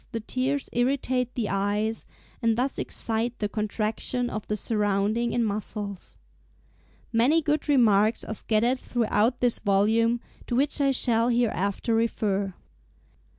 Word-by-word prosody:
103) 230 - -1
the 220 - -14
tears 265 +3 -1
irritate 250 0 0
the 230 -4 -1
eyes, 205 +3 -1 0.3
and 230 -1 +2
thus 265 +2 -1
excite 230 +2 -2
the 210 - -1
contraction 215 +3 -2
of 215 - -5
the 210 - -1
surrounding 210 +2 0
in 240 - +1
muscles. 205 -2 -5 1.0
Many 250 +8 +4
good 300 -1 -1
remarks 220 -5 +4
are - - -5
scattered 230 +4 +1
throughout 235 0 0
this 245 -2 +2
volume, 220 +4 +2 0.3
to 240 - -1
which 285 +3 +2
I 275 - +3
shall 240 -3 +2
hereafter 230 -2 0
refer. 205 -4 0
230 Hz, 135 wpm, -26 LUFS, 210-245 Hz, 1.0 s, Many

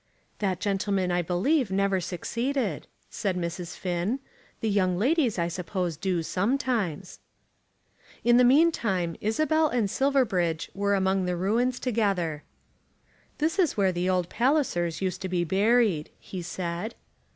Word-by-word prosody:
"That 190 -4 -1
gentleman 195 -2 0
I 175 0 +2
believe 200 - +1
never 195 0 +1
succeeded," 225 - -2 0.2
said 190 -3 -2
Mrs. 170 -1 -4
Finn. 180 +6 -1 0.4
"The 225 - -2
young 185 -3 +2
ladies 255 - +2
I 170 -1 +1
suppose 180 0 -3
do 180 +1 -1
sometimes." 200 - -1 1.0
In 240 0 +5
the 250 - +6
meantime 235 - +3
Isabel 310 +8 +2
and 240 -6 +1
Silverbridge 205 - +1
were 200 0 +1
among 190 -1 +1
the 180 0 -1
ruins 235 +7 +1
together. 195 - 0 1.0
"This 325 +5 0
is 340 -11 +2
where 195 -2 +3
the 180 +1 -1
old 180 -2 +1
Pallisers 230 - 0
used 185 0 -2
to 190 - -3
be 180 -1 0
buried," 200 -2 +2
he 185 - -7
said. 175 +5 -4
195 Hz, 135 wpm, -27 LUFS, 175-240 Hz, 1.0 s, the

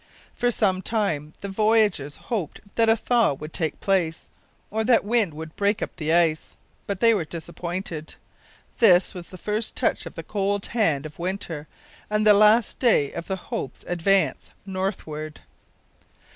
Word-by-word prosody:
For 245 - +1
some 190 -5 +1
time 170 -9 -1
the 200 - -4
voyagers 205 -8 +2
hoped 200 -11 -4
that 225 -1 +3
a 225 - +6
thaw 230 - +2
would 150 +3 -9
take 160 -4 -2
place, 175 -4 0 0.4
or 220 +1 0
that 230 -2 +3
wind 210 -7 +1
would 160 +1 -8
break 205 +1 +1
up - - -6
the 155 -1 -1
ice. 165 -2 +1 0.3
But 200 -2 -3
they 230 0 +6
were 200 - 0
disappointed. 170 0 -6 0.6
This 190 -6 +5
was 175 -2 -8
the 185 - -10
first 210 +4 -3
touch - - 0
of - - -10
the - - -6
cold 200 0 -1
hand 165 - +1
of 155 +1 -10
winter, 170 -4 -4 0.4
and 210 0 +1
the 210 - +8
last 215 +2 +4
day 220 - +3
of 170 - -6
the 190 - -1 0.2
Hope's 130 - -4
advance 185 +3 +1 0.2
northward. 180 -6 -4
190 Hz, 160 wpm, -24 LUFS, 160-215 Hz, 0.6 s, the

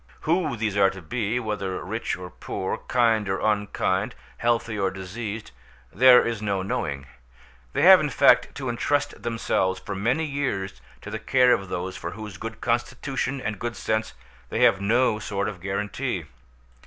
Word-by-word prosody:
Who 160 -5 0
these 110 -2 -1
are 100 -1 +5
to 95 0 -9
be, 115 +5 -1
whether 105 -6 -3
rich 110 +1 -3
or 90 -1 -8
poor, 95 - -4
kind 115 -5 +2
or 95 - 0
unkind, 100 -2 0 0.2
healthy 115 -2 0
or 95 -1 +2
diseased, 100 +3 -6 0.4
there 125 +3 +7
is 115 -3 -2
no 100 -3 -1
knowing; 70 -7 -3 0.7
they - - +1
have, - - +10
in - - 0
fact, - - +4
to 135 -2 -5
entrust 140 +4 -1
themselves 105 -5 0
for 100 - -6
many 120 +11 0
years 130 - -3 0.2
to 100 - -8
the 110 - -3
care 125 +2 +4
of 95 -1 -2
those 90 +1 -4
for 85 - -5
whose 105 -3 -8
good 115 +1 -7
constitution 130 +3 -1
and 105 -4 -4
good 120 -1 -3
sense 110 0 -2 0.3
they - - -2
have 95 - +5
no 110 +1 +2
sort 100 -1 -2
of 95 -4 -6
guarantee. 100 - -3
105 Hz, 165 wpm, -25 LUFS, 95-120 Hz, 0.7 s, have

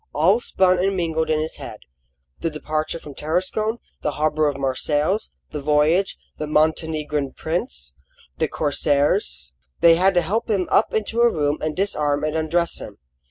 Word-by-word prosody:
All 190 +9 +4
spun 185 -6 +2
and 195 +1 +1
mingled 160 -2 -1
in 155 -1 +2
his 155 +1 -3
head: - - -8 0.6
the 165 - -1
departure 155 +1 -3
from 150 -3 -10
Tarascon, 185 - -1 0.2
the 150 - -1
harbour 155 0 +1
of 145 -2 -1
Marseilles, 145 +8 0 0.2
the 150 - -4
voyage, 150 +6 +2 0.2
the 150 - -3
Montenegrin 150 -2 0
prince, 65 - -3 0.5
the - - +2
corsairs. 140 - 0 0.3
They 165 -1 +6
had 190 +2 +3
to 175 - +5
help 220 +8 -1
him 195 -4 +1
up - - +4
into 220 +2 0
a 235 0 +5
room 145 -1 0
and 155 0 -2
disarm 150 -7 0
and 155 0 -1
undress 165 +2 0
him. - - -9
155 Hz, 160 wpm, -22 LUFS, 150-180 Hz, 0.6 s, They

